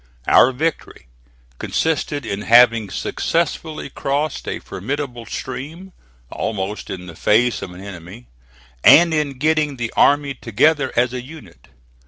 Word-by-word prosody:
Our 130 - +5
victory 155 - -4 0.5
consisted 150 -4 -1
in 100 -2 -4
having 115 -2 +5
successfully 160 - -2
crossed 145 +3 -2
a - - -2
formidable 125 +2 -5
stream, 160 +9 -7 0.4
almost 105 -1 -4
in 90 -1 -6
the 85 -2 -10
face 115 +7 +2
of 90 - -7
an 90 +1 -11
enemy, 100 +4 -10 0.6
and 170 +1 +7
in 150 -4 -1
getting 150 0 +1
the 115 -2 -4
army 145 -1 +3
together 135 +4 +1
as 120 +1 +1
a 125 - -4
unit. 120 - -14
130 Hz, 130 wpm, -20 LUFS, 110-150 Hz, 0.6 s, and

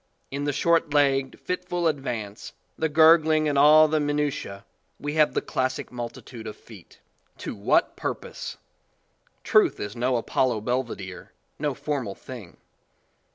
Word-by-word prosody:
In 140 +1 -3
the 145 - +1
short 165 +1 +1
legged, 135 -2 +2
fit 180 0 -3
ful 175 -1 +1
advance, 120 -9 -4 0.2
the 160 - -1
gurgling 160 0 +5
and 145 - 0
all 155 +2 +7
the 155 0 +1
minutise 145 -9 -2 0.4
we 145 0 -3
have 155 -1 +3
the - - 0
classic 130 0 -2
multitude 120 -1 -7
of 105 - -6
feet. 105 -7 -16 0.4
To - - -5
what - - +1
purpose! - - -5 0.9
Truth - - +3
is 105 +2 -5
no 125 +2 0
Apollo 120 -1 0
Belvedere, 115 -6 -4 0.3
no 145 -2 -1
formal 140 -8 -3
thing. 115 -9 -11
140 Hz, 140 wpm, -25 LUFS, 120-150 Hz, 0.9 s, all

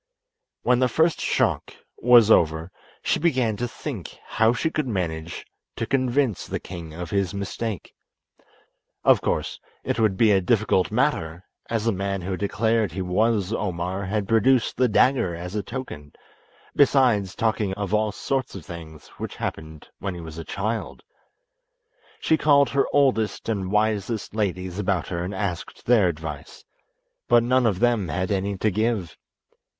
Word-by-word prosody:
When 125 -1 +3
the 130 - +3
first 160 +6 +1
shock - - 0 0.2
was 120 -2 +6
over 80 0 +3 0.3
she - - +1
began 130 -9 +1
to 120 - -2
think - - -7
how 110 +1 +2
she 140 +7 -1
could 150 -4 -1
manage 85 -6 -3 0.3
to - - -2
convince 130 -3 0
the - - -3
king 85 -3 -8
of 85 +1 -7
his 100 -1 0
mistake. 100 0 -4 1.1
Of - - +5
course - - -2 0.2
it - - -2
would 105 -4 +2
be 110 0 +5
a 95 -1 +4
difficult 100 -1 +2
matter, 95 - 0 0.3
as 115 -1 -1
the 115 - +3
man 100 0 -2
who 95 +1 -3
declared 110 +1 0
he 95 +3 -3
was 105 +2 +1
Omar 95 -2 -2
had 100 +1 -2
produced 115 +3 +3
the 125 +1 +3
dagger 120 -5 +2
as 90 +2 -7
a 105 - -1
token, 100 - -7 0.6
besides 125 -9 +3
talking 110 -3 0
of 100 0 -4
all 105 0 +2
sorts 130 +3 -3
of 90 -6 -8
things 80 -3 -10
which - - -5
happened 80 -1 -6
when 100 -3 -4
he 85 - -7
was 80 0 -8
a - - -5
child. 110 +6 -4 1.2
She 160 - +2
called 140 -2 +4
her 140 0 +1
oldest 130 -7 +1
and 100 -4 -2
wisest 105 0 0
ladies 95 -3 -2
about 95 -4 -1
her 85 -1 -2
and 95 +2 -4
asked 95 -3 -4
their 115 -6 +4
advice, 75 -3 -6 0.6
but 120 -1 +5
none 125 0 +3
of 100 -5 +1
them 115 -3 +2
had 95 +6 -2
any 100 0 -1
to 110 +2 +1
give. 110 -4 -1
105 Hz, 160 wpm, -24 LUFS, 90-115 Hz, 1.2 s, was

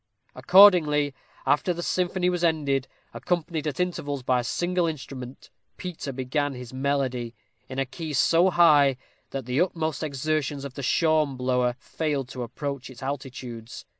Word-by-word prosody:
Accordingly, 155 -8 +6 0.3
after 175 +4 +2
the 175 - -4
symphony 180 0 0
was 180 -1 0
ended, 145 -5 +1 0.3
accompanied 165 -3 -2
at 145 - -3
intervals 145 -7 -2
by 125 0 +2
a - - -2
single 175 +6 0
instrument, 135 -4 -7 0.3
Peter 175 -6 -5
began 135 +2 -2
his 125 0 -9
melody, 130 -3 -1 0.3
in 130 - -6
a 135 - +1
key 155 +3 -6
so 165 +6 +4
high, 145 -7 +5 0.3
that 135 -3 -5
the 125 +5 +1
utmost 160 -4 -1
exertions 145 -1 -2
of 140 - -7
the 140 - -6
shawm 155 0 +2
blower 125 -1 +1
failed 145 -3 -3
to 130 - -6
approach 135 +2 -5
its 130 -1 -11
altitudes. 125 -4 -6
140 Hz, 150 wpm, -26 LUFS, 130-160 Hz, 0.3 s, Accordingly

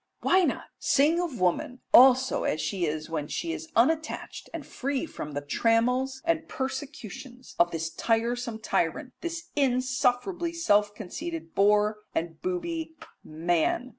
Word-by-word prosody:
Why 375 - +4
not - - -1 0.2
sing 310 +5 +3
of 320 -9 -4
woman 185 +8 0
also 260 0 +6
as 155 - 0
she 180 -2 -1
is 155 0 -3
when 155 -3 -3
she 335 - -3
is 325 -1 -7
unattached 315 +7 0
and 330 -4 -6
free 275 +3 -2
from 150 - -7
the 145 - -2
trammels 250 - +1
and 325 -1 0
persecutions 265 -2 -6
of 175 - +5
this 165 -1 -3
tiresome 235 +3 -1
tyrant, 175 +7 -1
this 340 0 -5
insufferably 260 +5 +1
self 205 -11 +2
conceited 320 - -6
bore 210 +1 +3 0.2
and 165 0 -3
booby, 335 -3 -3 0.3
man? 170 +9 0
255 Hz, 135 wpm, -27 LUFS, 205-320 Hz, 0.3 s, also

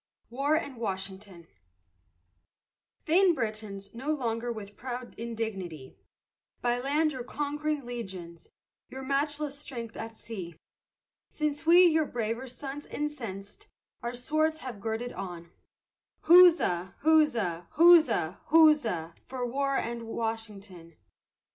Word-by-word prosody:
WAR 280 +5 +1
AND 285 -5 -3
WASHINGTON 190 -4 -5 1.6
Vain 350 +2 +4
Britons, 215 -5 -4
boast - - -22
no 265 +6 -5
longer 240 -5 -1
with 205 -3 -8
proud 250 0 -6
indignity, 205 - -5 0.6
By 245 0 0
land 295 +4 +1
your 255 -2 -5
conquering 295 +1 -3
legions, 190 -9 -7 0.4
your 265 0 -7
matchless 285 +1 -1
strength 235 -6 -7
at 225 0 -7
sea, 185 -7 -7 0.7
Since 300 +1 -3
we, 350 +2 +8
your 315 -3 +3
braver 235 +2 -3
sons 275 +3 -7
incensed, 250 - -6 0.3
our 240 0 -4
swords 310 +5 0
have 240 -6 -7
girded 225 +3 -3
on, 175 -3 -7 0.7
Huzza, 330 - +6
huzza, 240 - +3
huzza, 310 - +5
huzza, 285 - +4
for 255 -1 -3
war 275 +3 0
and 235 0 -3
Washington. 210 -7 -5
240 Hz, 110 wpm, -29 LUFS, 205-295 Hz, 1.6 s, we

